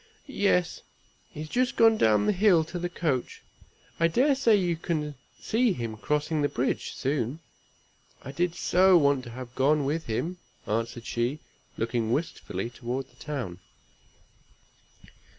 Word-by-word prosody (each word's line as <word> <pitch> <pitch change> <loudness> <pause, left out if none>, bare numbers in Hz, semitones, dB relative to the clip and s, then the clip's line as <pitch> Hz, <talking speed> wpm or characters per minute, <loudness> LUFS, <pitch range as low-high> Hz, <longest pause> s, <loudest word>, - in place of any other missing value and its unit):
"Yes! 200 - +1 0.5
he 150 - -8
is 155 - -5
just 250 +5 0
gone 225 -1 +6
down 105 - +3
the - - +3
hill 190 -4 +4
to 175 +3 -6
the 175 +1 -2
coach. 155 -8 -2 0.6
I 165 - +5
dare 260 - +3
say 250 -5 +4
you 180 -4 +1
can 155 -3 -3 0.3
see 230 -1 +1
him 115 -5 -4
crossing 150 +6 -1
the 145 - +1
bridge, 125 - -2
soon. 135 +1 -1 0.8
I 135 - -7
did 170 +4 -1
so 185 +1 +5
want 140 -4 +3
to - - -8
have 125 +1 -8
gone 140 +3 +2
with 160 +4 -2
him," 165 +11 -2 0.3
answered 115 +2 -2
she, 120 +5 -1 0.4
looking 115 0 -1
wistfully 120 - -3
toward 125 +3 -5
the - - -26
town. 120 - -4
150 Hz, 150 wpm, -27 LUFS, 120-175 Hz, 0.8 s, gone